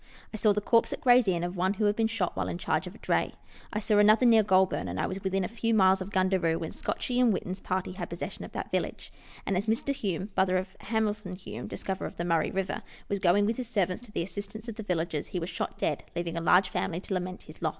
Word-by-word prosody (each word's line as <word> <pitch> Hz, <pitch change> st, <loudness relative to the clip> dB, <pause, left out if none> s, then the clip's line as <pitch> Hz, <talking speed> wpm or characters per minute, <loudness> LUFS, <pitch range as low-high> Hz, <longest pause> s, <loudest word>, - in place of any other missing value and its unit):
I -, -, -3 dB
saw 215 Hz, 0 st, +4 dB
the 210 Hz, +1 st, +1 dB
corpse 230 Hz, +2 st, +3 dB
at -, -, -4 dB
Gray's 250 Hz, -5 st, +6 dB
inn 175 Hz, -2 st, +1 dB
of 175 Hz, +1 st, -3 dB
one 190 Hz, +2 st, +1 dB
who 210 Hz, -, 0 dB
had 205 Hz, 0 st, +3 dB
been 225 Hz, 0 st, +2 dB
shot 220 Hz, -6 st, -1 dB
while 95 Hz, -1 st, -1 dB
in 85 Hz, -1 st, -3 dB
charge -, -, -1 dB
of -, -, -9 dB
a -, -, -11 dB
dray. -, -, 0 dB, 0.4 s
I -, -, -3 dB
saw 210 Hz, 0 st, +3 dB
another 215 Hz, +4 st, +6 dB
near 225 Hz, -2 st, +7 dB
Goulburn, 190 Hz, -, +2 dB
and 90 Hz, +1 st, -4 dB
I -, -, +1 dB
was 190 Hz, +1 st, -4 dB
within 190 Hz, 0 st, 0 dB
a -, -, -1 dB
few 230 Hz, 0 st, 0 dB
miles 190 Hz, -2 st, +5 dB
of 185 Hz, -, -4 dB
Gundaroo 185 Hz, -4 st, +2 dB
when 160 Hz, -, -4 dB
Scotchie 250 Hz, 0 st, -1 dB
and 245 Hz, -2 st, +5 dB
Whitten's 185 Hz, -1 st, -3 dB
party 185 Hz, 0 st, -2 dB
had 180 Hz, -1 st, -6 dB
possession 170 Hz, -, -5 dB
of -, -, -8 dB
that -, -, -5 dB
village; -, -, -3 dB, 0.3 s
and 195 Hz, -, 0 dB
as 200 Hz, +4 st, -1 dB
Mr. 230 Hz, +5 st, +1 dB
Hume 195 Hz, -, -3 dB
(brother 185 Hz, -1 st, +3 dB
of 185 Hz, +1 st, -2 dB
Hamilton 210 Hz, -4 st, -1 dB
Hume, 190 Hz, -, -7 dB
dis -, -, -7 dB
coverer 190 Hz, -1 st, -2 dB
of -, -, -11 dB
the 170 Hz, -, -2 dB
Murray 165 Hz, -2 st, +2 dB
river) 190 Hz, 0 st, -2 dB, 0.3 s
was 200 Hz, -, 0 dB
going 195 Hz, +2 st, +4 dB
with 225 Hz, +2 st, 0 dB
his 250 Hz, -2 st, -4 dB
servants 200 Hz, -2 st, 0 dB
to -, -, -15 dB
the 170 Hz, -, -1 dB
assistance 205 Hz, +4 st, -7 dB
of 230 Hz, -, -4 dB
the 220 Hz, -, -7 dB
villagers 170 Hz, -6 st, -2 dB
he 185 Hz, -, -3 dB
was 170 Hz, +2 st, -4 dB
shot -, -, -4 dB
dead, -, -, -1 dB
leaving 170 Hz, -1 st, -2 dB
a 170 Hz, -, -2 dB
large 180 Hz, +3 st, +5 dB
family 170 Hz, -1 st, -2 dB
to 195 Hz, -, -4 dB
lament 185 Hz, 0 st, -3 dB
his 155 Hz, -, -14 dB
loss. 160 Hz, -, +2 dB
190 Hz, 270 wpm, -29 LUFS, 180-215 Hz, 0.4 s, near